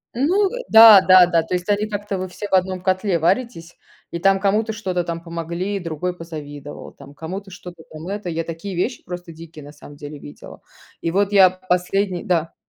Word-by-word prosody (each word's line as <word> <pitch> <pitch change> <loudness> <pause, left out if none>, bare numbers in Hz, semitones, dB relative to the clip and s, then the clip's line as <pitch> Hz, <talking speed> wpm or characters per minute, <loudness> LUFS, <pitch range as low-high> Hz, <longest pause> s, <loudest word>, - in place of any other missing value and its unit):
Ну, 360 - +2
э, - - -6
да-да-да. 185 -6 +8
То 170 - -3
есть 180 +2 -5
они 205 +1 +1
как-то, 205 -1 -4
вы 185 0 -4
все 185 +3 -8
в - - -8
одном 185 0 +1
котле 185 0 0
варитесь, 175 0 -2 0.3
и 170 - -4
там 195 +2 +3
кому-то 210 +3 0
что-то 185 -5 -3
там 170 0 -6
помогли- 170 +4 -4
другой 175 +1 -4
позавидовал, 145 -4 -9
там 140 +1 -16
кому-то 190 +6 -7
что-то 175 -2 -12
там 155 +2 -10
это 200 -1 -5
Я 165 0 -3
такие 165 +4 -7
вещи 225 +8 -3
просто 175 -1 -8
дикие, 160 -1 -12
на 145 - -11
самом 145 0 -14
деле, 145 0 -9
видела. 145 - -13 0.4
И 165 - -2
вот 200 +3 0
я 195 -2 +6
последний 185 0 -2
Да. 165 -2 -1
180 Hz, 190 wpm, -20 LUFS, 165-200 Hz, 0.4 s, да-да-да